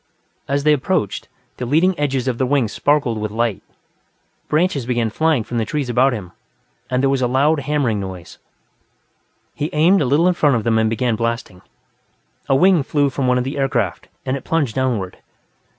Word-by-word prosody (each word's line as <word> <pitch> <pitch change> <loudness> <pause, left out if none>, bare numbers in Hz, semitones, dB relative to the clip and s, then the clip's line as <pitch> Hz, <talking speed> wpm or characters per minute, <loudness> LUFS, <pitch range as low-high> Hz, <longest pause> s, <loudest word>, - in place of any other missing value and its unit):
As 140 0 0
they 150 0 +5
approached, 150 - -1 0.3
the 125 - -4
leading 165 +8 +3
edges 135 -3 -1
of 125 -2 -1
their 130 - +1
wings 130 -5 +1
sparkled 140 -4 +1
with 105 - -2
light, 115 -2 -1 0.9
branches 155 -6 0
began 120 -3 0
flying 155 -2 +1
from 120 +2 -3
the - - +1
trees 130 +3 -3
about 130 +3 +3
him, 100 -7 -6 0.6
and 125 +1 0
there 135 - +3
was 135 -1 0
a 125 - +2
loud 145 +5 +2
hammering 135 -6 0
noise. 95 -3 -8 1.1
He 150 - -3
aimed 170 +5 +4
a - - +1
little 145 +7 +3
in 180 - +3
front 145 -6 +2
of 115 - -1
them 110 0 +2
and 110 0 +2
began 115 0 0
blasting. 115 -5 -3 0.9
A 135 - +4
wing 180 +3 +4
flew 140 0 0
from 130 -1 -1
one 125 0 +3
of 125 - 0
the 135 +3 -4
aircraft, 120 -8 -1 0.2
and 130 - -1
it 135 - -6
plunged 150 -8 0
downward. 120 -8 -2
130 Hz, 190 wpm, -19 LUFS, 115-145 Hz, 1.1 s, they